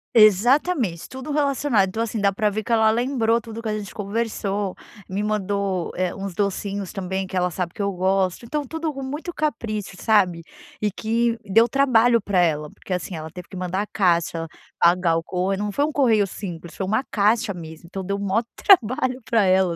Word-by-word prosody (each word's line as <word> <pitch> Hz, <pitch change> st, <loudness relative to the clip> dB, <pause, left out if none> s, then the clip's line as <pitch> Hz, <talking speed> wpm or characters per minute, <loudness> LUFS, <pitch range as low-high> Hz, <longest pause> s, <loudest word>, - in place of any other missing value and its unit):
Exatamente, 220 Hz, -, +4 dB
tudo 265 Hz, +3 st, -7 dB
relacionado. 275 Hz, -8 st, +2 dB
Então, 225 Hz, +4 st, -3 dB
assim 225 Hz, -1 st, -2 dB
dá 200 Hz, -1 st, +3 dB
pra 210 Hz, +2 st, +1 dB
ver 215 Hz, +1 st, -3 dB
que 235 Hz, -, -5 dB
ela 220 Hz, -1 st, +5 dB
lembrou 235 Hz, -1 st, +1 dB
tudo 230 Hz, +1 st, -8 dB
que 225 Hz, -, -5 dB
a 215 Hz, -, -1 dB
gente 205 Hz, -2 st, -7 dB
conversou, 205 Hz, -2 st, -2 dB, 0.4 s
me 195 Hz, +2 st, -2 dB
mandou 200 Hz, -3 st, -1 dB
eh, 185 Hz, -1 st, -1 dB
uns 195 Hz, -2 st, -5 dB
docinhos 200 Hz, 0 st, -2 dB
também, 190 Hz, 0 st, -3 dB
que 190 Hz, -, -7 dB
ela 180 Hz, 0 st, +1 dB
sabe 175 Hz, 0 st, -3 dB
que -, -, -6 dB
eu 200 Hz, 0 st, 0 dB
gosto. 190 Hz, +3 st, 0 dB
Então, 295 Hz, +4 st, -2 dB
tudo 320 Hz, +2 st, -3 dB
com 270 Hz, 0 st, -6 dB
muito 300 Hz, +6 st, -5 dB
capricho, 215 Hz, -10 st, -3 dB
sabe? 185 Hz, -6 st, +3 dB, 0.4 s
E 210 Hz, -, +2 dB
que 230 Hz, +3 st, 0 dB
deu 225 Hz, +4 st, +4 dB
trabalho 240 Hz, -3 st, +4 dB
pra 200 Hz, -2 st, +1 dB
ela, 150 Hz, -3 st, +1 dB
porque 185 Hz, -, -7 dB
assim 180 Hz, 0 st, -3 dB
ela 160 Hz, 0 st, -6 dB
teve 180 Hz, +2 st, -10 dB
que 190 Hz, -, -8 dB
mandar 185 Hz, +2 st, -2 dB
a -, -, -2 dB
caixa, 170 Hz, -3 st, +1 dB, 0.3 s
pagar 170 Hz, -1 st, +4 dB
o 165 Hz, -, -2 dB
corre 190 Hz, +2 st, -1 dB
não 205 Hz, 0 st, -2 dB
foi 285 Hz, -, +1 dB
um 310 Hz, -, -2 dB
correio 225 Hz, -8 st, +3 dB
simples, 175 Hz, -4 st, -7 dB
foi 190 Hz, -, -3 dB
uma 220 Hz, +7 st, +1 dB
caixa 210 Hz, 0 st, +2 dB
mesmo. 160 Hz, -1 st, -10 dB
Então, 190 Hz, +1 st, -5 dB
deu 200 Hz, +2 st, -2 dB
o -, -, -6 dB
maior 200 Hz, +4 st, +1 dB
trabalho 255 Hz, -, +3 dB
pra 225 Hz, -4 st, +4 dB
ela, 185 Hz, -2 st, +3 dB
205 Hz, 205 wpm, -23 LUFS, 185-230 Hz, 0.4 s, ela